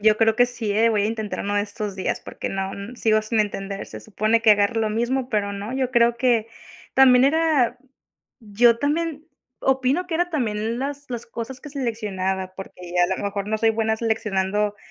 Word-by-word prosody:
Yo 215 0 +4
creo 225 0 +3
que 245 0 +5
sí, 235 -4 -4
eh, 225 +2 +3
voy 210 -2 +1
a - - +2
intentar 220 -2 -3
uno 205 +1 -1
de 205 - +2
estos 205 -1 -5
días 190 - -2
porque - - -6
no 195 0 -3
n 200 +5 -8
sigo 215 -2 +3
sin 215 0 0
entender. 195 -1 -3
Se - - -8
supone 215 +2 +1
que 220 -2 +7
agarro 205 +2 +1
lo 215 -1 0
mismo, 245 +3 -1
pero 205 -3 -1
no, 200 +4 -5
yo 260 -1 -1
creo 235 -1 +3
que 235 -3 +2 0.5
también 260 -1 +6
era 285 -5 +2 0.6
yo 230 +2 +3
también 310 +1 -1 0.4
opino 265 +7 +1
que 330 - -2
era 350 +1 +1
también 230 -5 -2
las 285 +1 -4
las 235 -2 -5
cosas 235 +3 -6
que 295 - -9
seleccionaba, 195 -8 -3
porque 180 -2 -9
a - - +2
la 190 +1 -3
mejor 200 0 -3
no 220 0 0
soy 225 +1 +3
buena 220 0 0
seleccionando 210 -2 0
225 Hz, 200 wpm, -23 LUFS, 205-250 Hz, 0.6 s, que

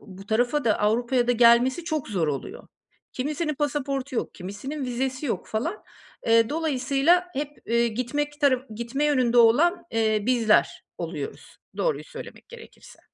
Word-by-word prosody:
bu 195 0 -13
tarafa 245 +6 +1
da 220 - +2
Avrupa'ya 240 +4 +1
da 245 - +3
gelmesi 245 +6 +4
çok 310 -7 -3
zor 175 -7 0
oluyor. 265 - -5 0.4
Kimisinin 305 +3 -2
pasaportu 275 -2 -2
yok, - - -3
kimisinin 210 +10 -6
vizesi 260 +3 -3
yok - - -3
falan. 320 - -3 0.4
Eee, 230 0 +4
dolayısıyla 305 +3 +1
hep, 290 +1 -3 0.2
eee, 235 +1 +2
gitmek 290 +6 -3
tara 265 -2 +2
gitme 235 +6 -2
yönünde 255 -5 +2
olan, 325 +11 +4
eee, 220 -2 +1
bizler 230 -4 +2
oluyoruz - - -6 0.2
doğruyu - - -1
söylemek - - -11
gerekirse. 475 -1 -14
255 Hz, 140 wpm, -25 LUFS, 230-295 Hz, 0.4 s, gelmesi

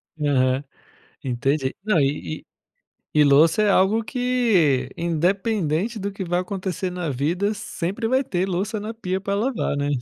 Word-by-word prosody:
Aham. 135 -3 +1 0.6
Entendi. 135 +2 0
Não 210 -5 +2
e 135 - -1
e - - -32 0.7
e 150 - +7
louça 155 +7 +5
é 210 - +3
algo 200 +4 +3
que, 220 - +1
independente 180 +3 0
do 200 0 -3
que 195 0 -5
vai 175 +1 0
acontecer 185 -1 -3
na 180 -3 -3
vida, 170 - 0
sempre 205 +1 -3
vai 260 +2 +2
ter 180 -3 -1
louça 195 +4 -2
na 215 +2 -5
pia 190 -4 -3
para 200 0 -1
lavar, 225 - -1
né. 145 0 -1
185 Hz, 155 wpm, -23 LUFS, 150-210 Hz, 0.7 s, e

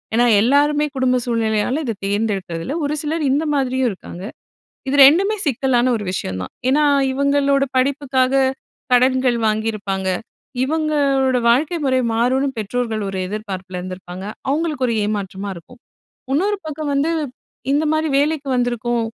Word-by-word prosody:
ஏன்னா, 240 - +4 0.2
எல்லாருமே 290 +5 +3
குடும்ப 260 -1 +2
சூழ்நிலையால 230 +2 0
இத 230 - -1
தேர்ந்தெடுக்கிறதில்ல. 200 - -2
ஒரு 290 - -1
சிலர் 315 +1 -2
இந்த 295 +4 +1
மாதிரியும் 260 -2 +1
இருக்காங்க. 185 -1 -9 0.7
இது 275 - 0
2மே 390 +9 +4
சிக்கலான 255 -2 +1
ஒரு 215 - -4
விஷயம் 95 - -3
தான். 95 - -7 0.2
ஏன்னா, 295 +3 +3 0.3
இவங்களோட 280 0 +2
படிப்புக்காக 265 -1 +1 0.6
கடன்கள் 255 -1 +3
வாங்கியிருப்பாங்க. 210 -3 -1 0.5
இவங்களோட 280 -3 +1
வாழ்க்கை 300 +8 +2
முறை 260 -1 +2
மாறும்னு 255 +4 +1
பெற்றோர்கள் 220 +1 -2
ஒரு 195 - -4
எதிர்பார்ப்பில 190 -3 -5
இருந்திருப்பாங்க. 185 0 -8 0.3
அவங்களுக்கு 300 -2 0
ஒரு 230 - 0
ஏமாற்றமா 200 -1 -3
இருக்கும். 205 +9 -14 0.5
இன்னொரு 395 +9 +1
பக்கம் 305 -1 -4
வந்து, 285 +4 +1 0.6
இந்த 295 +2 +2
மாரி 315 0 +1
வேலைக்கு 295 -1 0
வந்திருக்கோம் 240 -1 0
255 Hz, 130 wpm, -20 LUFS, 215-285 Hz, 0.7 s, ஏன்னா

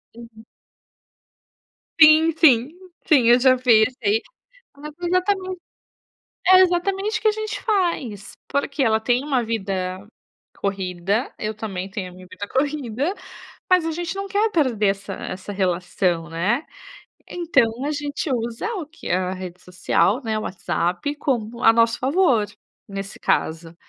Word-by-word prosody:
Uhum. 230 -1 -13 1.6
Sim, 315 +1 +7
sim, 260 -6 +5 0.4
sim 265 -7 +5
eu 240 +1 +6
já 255 0 +5
fiz 240 -2 +4
aí. 210 +2 +2 0.6
É 295 +2 -8 0.2
exatamente, 370 0 0 0.9
é 370 - +9
exatamente 390 +4 +1
o - - -16
que 440 - +4
a - - +3
gente 435 0 -4
faz, 335 - -1 0.2
porque 280 0 -1
ela 220 -3 +2
tem 245 +4 +1
uma 265 -5 +1
vida 195 -3 -3 0.5
corrida, 195 +3 -2
eu 215 0 -3
também 195 -3 -5
tenho 190 -2 -5
a - - -15
minha 185 0 -13
vida 205 - -7
corrida, 280 - -1 0.6
mas 365 -3 +4
a 325 - -1
gente 345 +2 -4
não 395 0 -4
quer 415 +3 +1
perder 255 - +1
essa 195 0 -4
essa 185 +2 -7
relação, 180 -3 -1
né. 195 - -1 0.6
Então 270 -8 0
a 295 - -1
gente 290 0 -3
usa 235 - -3
o 355 -6 -4
que? 330 +2 -11
A 185 +1 0
rede 185 -1 -8
social, 185 +6 +1
né, 220 -2 -1
o - - -5
WhatsApp 180 +8 -2
como 240 -4 -2
a 225 - +8
nosso 230 0 +2
favor, 260 - +2 0.4
nesse 195 -1 -7
caso. 165 +1 -1
235 Hz, 145 wpm, -22 LUFS, 195-310 Hz, 1.6 s, é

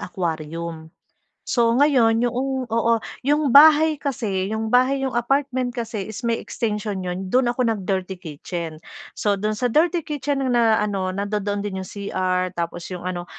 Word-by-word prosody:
aquarium. 165 -2 -4 0.6
So 230 -2 +3
ngayon 240 -4 +4
yoong 260 0 -2
oo, 230 0 +2 0.2
'yong 295 0 +2
bahay 305 +3 +7
kasi, 215 -8 -2
'yong 220 0 -2
bahay, 255 +3 +3
'yong 265 -3 -1
apartment 255 0 0
kasi 225 -4 -4
is 220 +2 -7
may 235 -1 0
extension 210 -3 -3
'yon. 180 +1 -4
Do'n 245 +6 +2
ako 245 +1 0
nag-dirty 190 -4 -2
kitchen. 160 0 -6 0.4
So 205 -1 +1
do'n 210 +2 -2
sa 250 - -1
dirty 325 +6 +2
kitchen 285 -2 -2
na, 230 -2 +4
ano, 200 -3 -1
nandodoon 205 +1 -2
din 190 -2 -4
'yong 185 - -9
CR 185 -2 -2
tapos 170 0 -4
'yong 180 - -6
ano, 180 -1 -4
220 Hz, 155 wpm, -22 LUFS, 185-255 Hz, 0.6 s, bahay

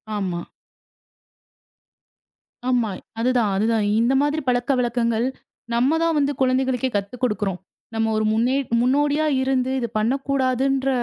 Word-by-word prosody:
ஆமா. 185 -4 -2 2.3
ஆமா. 240 -4 +1 0.3
அதுதான், 240 -3 +2
அதுதான். 220 +1 +1
இந்த 235 +3 +2
மாதிரி 295 +2 0
பழக்க 245 +2 +1
வழக்கங்கள் 235 -1 0 0.5
நம்மதான் 320 +7 +2
வந்து 285 0 +2
குழந்தைகளுக்கே 260 0 +1
கத்துக்கோடுக்குறோம். 205 -2 -2 0.4
நம்ம 225 0 0 0.2
முன்னே 240 +4 +1 0.2
முன்னோடியா 290 +5 +2 0.2
இருந்து 260 -1 0
இது 235 - -2
பண்ணக்கூடாதுன்ற 270 +2 0
250 Hz, 100 wpm, -22 LUFS, 225-270 Hz, 2.3 s, அதுதான்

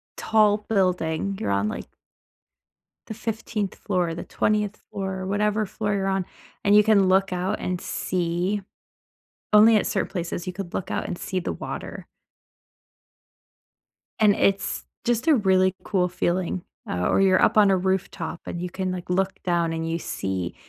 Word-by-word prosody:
tall 210 -1 +2
building. 185 -2 0
You're 100 - -1
on, 100 +1 +1
like - - -6 1.2
the - - -5
15th 220 -2 -3
floor, 180 -5 -1
the 165 - -6
20th 210 -1 0
floor, 190 -1 -4
whatever 210 +2 +1
floor 210 +1 -2
you're 195 -1 0
on, 190 -1 0 0.4
and 200 +1 +5
you 210 - +8
can 205 -3 +4
look 190 +1 +3
out 185 +3 -1
and 180 -1 -2
see- 180 +3 -1 0.9
only 215 +1 +8
at - - 0
certain - - -1
places- 175 -2 -4
you - - -1
could 185 -1 -6
look - - -3
out - - -2
and 175 - -4
see 185 - -3
the 180 - -3
water. - - -7 2.1
And 210 -2 +5
it's 195 0 0 0.2
just 240 +4 0
a 315 - +6
really 190 -4 +3
cool 185 -4 +1
feeling, 175 0 -1 0.3
uh, 90 0 0
or - - +3
you're 190 -1 +4
up - - +3
on 205 -2 +6
a 190 - +4
rooftop 185 -2 -2
and 175 - -5
you 180 - -3
can, 185 +1 -3
like, 180 -1 -6
look 190 +1 +1
down 170 -2 +1
and 165 0 -3
you 165 +1 -1
see 95 - -3
190 Hz, 165 wpm, -24 LUFS, 175-205 Hz, 2.1 s, you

